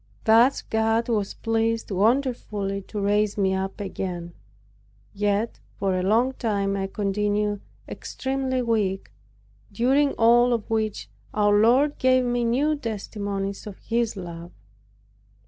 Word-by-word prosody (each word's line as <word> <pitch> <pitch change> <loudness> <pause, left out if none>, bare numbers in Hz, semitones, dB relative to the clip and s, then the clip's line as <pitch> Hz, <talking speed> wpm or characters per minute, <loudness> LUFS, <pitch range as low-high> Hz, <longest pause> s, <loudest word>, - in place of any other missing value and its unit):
Thus 235 +5 +4
God 225 +1 0
was 210 -4 -1
pleased 225 0 -1
wonderfully 210 -2 0
to 210 - -5
raise 205 +1 +1
me 190 -2 +2
up 190 +1 -3
again; 180 -3 -5 0.8
yet 205 +2 -1 0.2
for 195 -1 -1
a 185 - 0
long 230 +7 +2
time 200 -5 -1
I 195 -1 -2
continued 205 +1 -1 0.3
extremely 265 -1 -3
weak, 210 -5 -1 0.6
during 270 +7 +2
all 240 +2 +4
of 230 -3 -2
which 220 -2 -1 0.3
our 205 -1 +3
Lord 250 +8 +3
gave 255 0 +3
me 245 0 0
new 275 +7 +1
testimonies 205 -5 -4
of 200 - -8
His 230 -2 -1
love. 170 -1 -8
215 Hz, 125 wpm, -24 LUFS, 200-240 Hz, 0.8 s, Thus